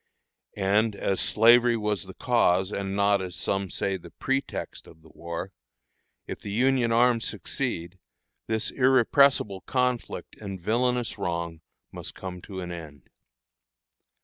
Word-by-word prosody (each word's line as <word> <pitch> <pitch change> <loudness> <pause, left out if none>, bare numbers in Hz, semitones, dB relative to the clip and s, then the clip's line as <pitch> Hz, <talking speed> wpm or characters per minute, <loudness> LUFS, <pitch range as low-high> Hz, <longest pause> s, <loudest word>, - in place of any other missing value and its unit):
And 105 +2 +2
as 95 -1 -1
slavery 120 +2 +5
was 105 -2 -1
the 95 - -11
cause, 95 -6 +2
and 100 -1 -3
not, 100 -1 +3
as 90 -1 -5
some 95 +3 -1
say, 95 +2 -1
the 85 -1 -13
pretext, 135 +7 -3
of 80 - -17
the 80 - -17
war, 85 0 -6 0.7
if - - -6
the - - -8
Union 125 +2 +2
arms 120 0 +3
succeed, 85 +3 -4 0.5
this 110 -1 0
"irrepressible 130 -5 +4
conflict" 125 -2 -1
and 100 -3 -7
villanous 120 +4 0
wrong 85 -3 -3 0.3
must - - -7
come 90 -1 -7
to 95 -1 -7
an 90 -1 -6
end. 75 -6 -10
100 Hz, 135 wpm, -26 LUFS, 90-120 Hz, 0.7 s, slavery